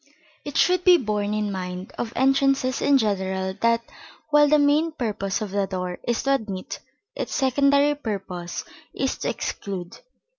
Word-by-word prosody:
It 290 - -5
should 360 0 +3
be 360 -1 +7
borne 210 -6 -1
in 210 -1 -1
mind 180 0 -5
of 230 - -4
entrances 270 -1 +2
in 285 -1 +4
general 190 -4 -1
that, 230 0 +3 0.5
while 295 0 +6
the 300 +1 +5
main 295 +3 +3
purpose 215 -6 -2
of 200 -2 -7
a 200 -1 +1
door 180 -2 -4
is 240 -1 -1
to 275 - +2
admit, 205 -8 -4 0.4
its - - -4
secondary 280 +2 +3
purpose 195 -10 -5 0.3
is - - -1
to - - -1
exclude. 185 -4 -5
225 Hz, 155 wpm, -24 LUFS, 195-280 Hz, 0.5 s, be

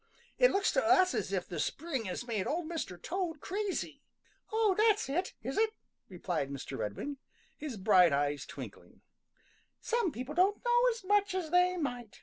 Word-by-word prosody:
It - - +7
looks 395 0 +2
to - - +2
us 370 +2 +5
as - - -2
if - - -1
the - - -5
spring 275 -9 -2
has 190 +5 -4
made 220 -5 -2
Old 330 +2 -2
Mr. 310 - -4
Toad 345 - -3
crazy." 400 +4 -3 0.5
"Oh, 440 -2 +3
that's 430 0 +3
it, 350 +7 -2
is 265 - -2
it?" 440 0 +2 0.3
replied 175 -6 -3
Mr. 140 -1 -6
Redwing, 135 - -4 0.4
his 290 -7 -6
bright 185 -3 +5
eyes 145 0 0
twinkling. - - -10 0.8
"Some 470 -7 0
people 255 +2 -6
don't 385 +7 +2
know 480 0 +4
as 460 -3 -4
much 405 0 +2
as 350 -4 -3
they 360 +1 +4
might. 245 - -4
330 Hz, 170 wpm, -32 LUFS, -, 0.8 s, It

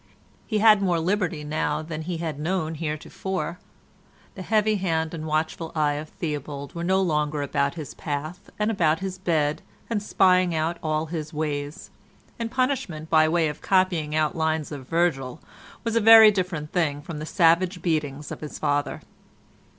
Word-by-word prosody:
He 215 - 0
had 215 -1 +6
more 180 -4 +1
liberty 175 -3 -1
now 150 0 -1
than 155 0 -5
he 170 +1 -4
had 160 -3 -4
known 165 0 -1
heretofore. 160 +3 -4 0.7
The 190 - -8
heavy 215 +2 +2
hand 160 -4 -1
and 160 -1 -5
watchful 160 +1 -2
eye 150 -2 +2
of 150 +1 -5
Theobald 145 -3 -5
were 170 - -5
no 190 +2 +2
longer 150 -3 0
about 140 +1 0
his 155 -4 -7
path 155 +3 -5
and 210 +1 +1
about 165 -7 +2
his 190 -1 -4
bed 155 -2 0 0.3
and 210 -3 0
spying 185 -3 +3
out 160 +2 -1
all 155 0 -1
his 160 -1 -5
ways; 145 -1 -4 0.5
and 230 -1 -2
punishment 230 - -2
by 155 -1 +5
way 165 -1 +2
of 150 0 -6
copying 180 -6 +1
out 155 -1 +1
lines 160 -1 -1
of 135 -3 -7
Virgil 165 -7 0 0.4
was 230 -1 -2
a 230 - +3
very 220 0 +9
different 180 -6 -3
thing 145 -5 0
from 160 -2 -6
the 155 - -5
savage 175 +1 +3
beatings 150 -4 -2
of - - -7
his 150 - -7
father. 145 -1 -1
160 Hz, 170 wpm, -25 LUFS, 150-185 Hz, 0.7 s, very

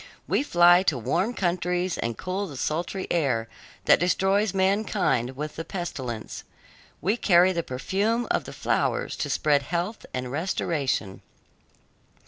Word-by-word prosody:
We - - +2
fly 175 -8 +5
to 160 -8 +1
warm 170 - -1
countries 180 0 0
and 115 -1 -3
cool 190 +2 -3
the 145 -6 -9
sultry 175 +7 -2
air 130 -9 +1 0.4
that - - +6
destroys 190 +3 +2
mankind 190 - +1
with 150 +2 -6
the 165 - -3
pestilence. 130 - -5 0.6
We 205 +4 +1
carry 185 -3 +4
the 170 - 0
perfume 200 - -1
of - - 0
the - - -8
flowers - - -1
to - - -2
spread 145 -2 +2
health 175 +8 -3
and 125 -1 -4
restoration. 145 - -1
175 Hz, 135 wpm, -26 LUFS, 140-190 Hz, 0.6 s, that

